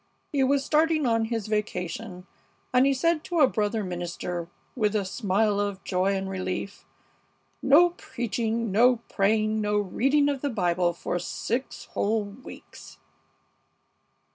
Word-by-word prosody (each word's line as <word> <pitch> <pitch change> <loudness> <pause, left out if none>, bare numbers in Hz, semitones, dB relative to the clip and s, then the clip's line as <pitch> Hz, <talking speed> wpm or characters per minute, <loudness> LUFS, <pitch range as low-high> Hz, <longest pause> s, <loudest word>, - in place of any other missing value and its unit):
He 275 -2 +3
was 275 +1 +2
starting 310 -1 +2
on 225 -2 +2
his 225 -2 -3
vacation, 195 -2 -3 0.5
and 255 +2 +5
he 275 - +3
said 330 +3 +1
to 345 -2 -1
a - - +9
brother 215 -2 -1
minister, 175 -1 -4 0.3
with 215 -3 +1
a 205 -2 +1
smile 205 +1 0
of 200 -2 -2
joy 190 +1 +1
and 195 0 -3
relief, 190 +1 -4 0.7
'No 295 +6 +6
preaching, 230 - -3
no 245 +5 +5 0.2
praying, 215 +2 +2
no 210 0 +1
reading 270 +9 +2
of 280 -2 -1
the 285 - -1
Bible 175 -5 +1
for 175 +1 -3
six 245 +8 -4
whole 215 +1 +1
weeks!'" 205 +5 -12
215 Hz, 140 wpm, -26 LUFS, 195-255 Hz, 0.7 s, a